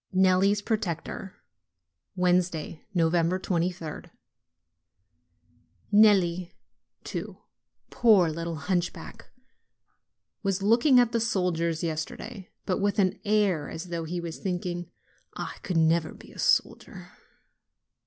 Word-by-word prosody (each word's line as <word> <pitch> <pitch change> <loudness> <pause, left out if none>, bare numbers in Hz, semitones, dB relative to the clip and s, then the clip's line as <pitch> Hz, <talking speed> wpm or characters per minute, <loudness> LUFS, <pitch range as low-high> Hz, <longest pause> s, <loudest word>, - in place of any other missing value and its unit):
NELLI'S 190 +2 +3
PROTECTOR 190 -3 -3 0.8
Wednesday, 180 -3 0
23d. 170 0 0 1.8
Nelli, 185 -5 +4 0.5
too, - - -6 0.5
poor 210 -7 +5
little 165 +1 -4
hunchback! 180 +5 -3 1.1
was 195 -1 -1
looking 240 +5 +5
at 240 -2 +3
the 235 - +1
soldiers 175 -7 0
yesterday, 165 +4 -5 0.2
but 185 - 0
with 205 0 0
an 190 -2 +1
air 200 -7 +1
as 170 +2 -7
though 170 -1 -3
he 175 +2 -3
were 170 -1 -5
thinking, 175 0 -4 0.5
"I - - -6
can 165 -4 +2
never 160 -1 0
be - - -15
a - - -14
soldier!" - - 0
180 Hz, 100 wpm, -27 LUFS, 170-200 Hz, 1.8 s, poor